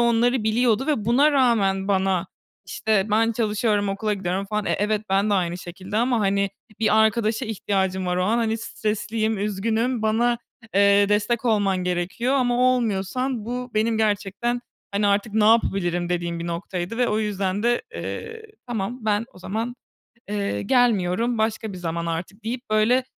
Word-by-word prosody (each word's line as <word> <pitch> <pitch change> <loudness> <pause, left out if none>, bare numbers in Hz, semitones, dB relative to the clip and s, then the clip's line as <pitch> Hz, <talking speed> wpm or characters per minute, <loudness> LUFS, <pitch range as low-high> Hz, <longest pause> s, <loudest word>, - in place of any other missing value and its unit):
onları 235 0 +2
biliyordu 230 +3 +2
ve 285 -9 0
buna 275 +7 +4
rağmen 205 -8 +2
bana, 190 -2 +1 0.4
işte, 215 -2 0
"Ben 225 +2 +3
çalışıyorum, 210 -2 0
okula 210 +2 -1
gidiyorum." 190 0 -2
falan. 210 0 -2
E, - - 0
evet, 210 +1 0
bende 200 +1 +2
aynı 175 -1 0
şekilde 185 +4 -7
ama, 240 0 +2
hani, 200 0 +1 0.3
bir 220 -1 +3
arkadaşa 220 +2 +2
ihtiyacım 190 -3 -1
var 180 - 0
o 180 - +1
an, 225 +4 +2
hani, 225 -1 0
stresliyim, 220 0 -2
üzgünüm. 220 +4 -1
Bana, 235 +2 +2 0.4
eee, 200 0 +5
destek 210 +4 +1
olman 205 -4 +2
gerekiyor 180 +9 -1
ama 245 -2 +2 0.2
olmuyorsan 230 +2 -1
bu 250 +1 -4
benim 220 +1 +1
gerçekten, 210 +3 0 0.3
hani, 200 +1 +1
"Artık 200 +1 +1
ne 215 -1 +3
yapabilirim?" 175 -6 +2
dediğim 170 -1 -2
bir 170 - -5
noktaydı 175 +5 -4
ve 245 - +2
o 210 - +1
yüzden 200 -1 -1
de, 240 0 +2
eee, 455 0 -6 0.2
"Tamam, 240 +1 -3
ben 215 +1 +1
o - - -15
zaman, 225 +6 -4 0.5
eee, 200 - -2
gelmiyorum. 230 - +2
Başka 220 -1 -1
bir - - -7
zaman 170 -1 -3
artık." 175 +6 -5
deyip, 245 +1 -5
böyle, 220 +4 +3
215 Hz, 160 wpm, -23 LUFS, 195-230 Hz, 0.5 s, eee